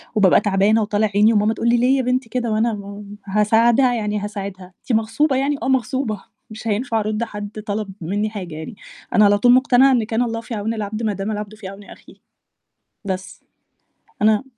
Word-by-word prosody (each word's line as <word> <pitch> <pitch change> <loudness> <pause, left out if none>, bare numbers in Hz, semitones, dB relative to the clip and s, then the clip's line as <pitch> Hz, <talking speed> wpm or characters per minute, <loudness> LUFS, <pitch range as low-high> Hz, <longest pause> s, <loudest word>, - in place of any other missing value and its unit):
وبابقى 195 -4 +5
تعبانة 205 +2 +2
وطالع 210 +1 +1
عيني 215 +2 +5
وماما 215 +1 +2
تقُول 235 - -1
لي: 240 - +4
"ليه 255 +3 +3
يا - - +1
بنتي 250 -1 -1
كده؟" 240 -2 -2
وأنا 220 +1 +1
ما 200 0 -8 0.2
هاساعدها 225 +5 +3
يعني 210 -2 -2
هاساعدها، 195 -3 -7
أنتِ - - -6
مغصوبة 265 +6 0
يعني؟ 275 +2 +1
آه - - -1
مغصوبة، 255 -4 -1 0.3
مش 220 +1 -8
هينفع 225 +2 0
أرُدّ 215 +1 -2
حَدّ 205 -3 -6 0.2
طَلَب 205 0 -3
مِنّي 205 +6 -1
حاجة 185 -7 -7
يعني، 160 +9 -8 0.4
أنا 215 - +6
على 205 0 +4
طول 245 +4 +4
مقتنعة 260 +1 +5
إن 245 -4 +2
كان 225 +2 -1
الله 230 -2 -2
في 230 - -8
عون 220 +1 -2
العبد 215 +1 -4
ما 215 - 0
دام 195 +2 -4
العبد 210 0 -5
في 210 -3 -9
عون 195 +1 -10
أخيه. - - -15 0.9
بس، 190 -1 -5 0.8
أنا 215 +1 +3
215 Hz, 195 wpm, -20 LUFS, 205-235 Hz, 0.9 s, أنا